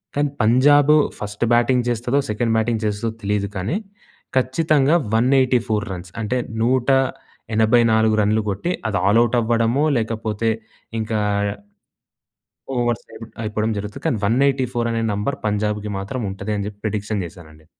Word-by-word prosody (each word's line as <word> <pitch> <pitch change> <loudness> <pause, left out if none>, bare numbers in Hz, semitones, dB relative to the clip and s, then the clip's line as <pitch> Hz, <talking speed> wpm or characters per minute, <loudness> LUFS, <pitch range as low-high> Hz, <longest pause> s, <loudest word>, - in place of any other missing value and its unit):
కానీ, 145 0 +1
Punjab 145 +6 +5 0.2
first 105 +2 -3
batting 120 +1 +3
చేస్తదో, 120 +3 0
second 115 +2 0
batting 110 0 0
చేస్తదో 105 +2 -1
తెలీదు 100 0 -1
కానీ. 100 - -1 0.6
ఖచ్చితంగా 145 +3 +2 0.2
184 125 -3 +2
రన్స్ 90 0 -9
అంటే 115 +4 -1 0.3
184 115 -3 +2
రన్‌లు 105 +2 +2
కొట్టి 100 - -2 0.2
అది 105 -2 0
ఆల్ 105 +4 +5
ఔట్ 120 +1 0
అవ్వడమో 115 +5 +1
లేకపోతే 110 -1 -1 0.5
ఇంకా 110 0 -2 1.6
ఓవర్స్ 120 -1 0
అయి - - -11 0.2
అయిపోవడం 110 +1 -1
జరుగుతుంది. 105 +1 -7
కానీ, 135 -8 +1
184 125 0 +1
అనే 115 0 -1
నెంబర్ 105 +7 -2
పంజాబ్‌కి 105 0 -1
మాత్రం 100 +6 -4
ఉంటది 100 +2 -4
అని 100 - -3
చెప్పి 105 0 -10
ప్రిడిక్షన్ 105 -1 -2
చేశానండి. 80 -3 -13
115 Hz, 130 wpm, -21 LUFS, 105-125 Hz, 1.6 s, Punjab